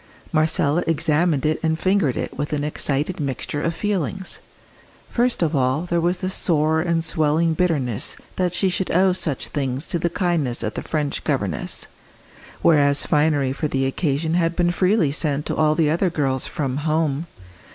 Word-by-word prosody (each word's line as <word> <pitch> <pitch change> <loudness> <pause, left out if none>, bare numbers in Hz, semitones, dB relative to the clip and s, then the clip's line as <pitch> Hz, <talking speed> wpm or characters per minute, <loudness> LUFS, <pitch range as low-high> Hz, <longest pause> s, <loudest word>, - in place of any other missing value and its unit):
Marcella 155 +1 +2
examined 160 -2 +1
it 155 +1 +1
and 160 -1 +1
fingered 185 -8 +1
it - - -4
with 145 +1 -3
an 145 -1 -1
excited 150 +3 -1
mixture 145 +1 -3
of 165 +1 -1
feelings. 190 -2 -2 0.7
First 240 -5 +1
of 160 -1 0
all 130 +3 +1
there 175 -1 0
was 175 +2 +1
the 185 - -3
sore 160 -4 +2
and 170 -1 0
swelling 160 +1 +1
bitterness 150 - -1 0.2
that 180 -1 0
she 180 +2 +2
should 185 0 -1
owe 185 +2 +3
such 155 -7 -3
things 135 0 -2
to 170 - -1
the 170 - 0
kindness 165 - -1
of 105 - -2
the - - -4
French 150 -3 -2
governess, 100 - -2 0.8
whereas 145 -3 +4
finery 145 -3 +2
for 155 +2 -2
the 135 -2 0
occasion 150 +3 -1
had 170 -1 +1
been 175 -1 +2
freely 185 -3 +2
sent 150 -1 0
to - - -2
all 155 -1 +3
the 155 -2 +2
other 175 +3 +1
girls 135 -5 -1
from 135 -3 -2
"home." 155 0 0
155 Hz, 170 wpm, -22 LUFS, 145-175 Hz, 0.8 s, whereas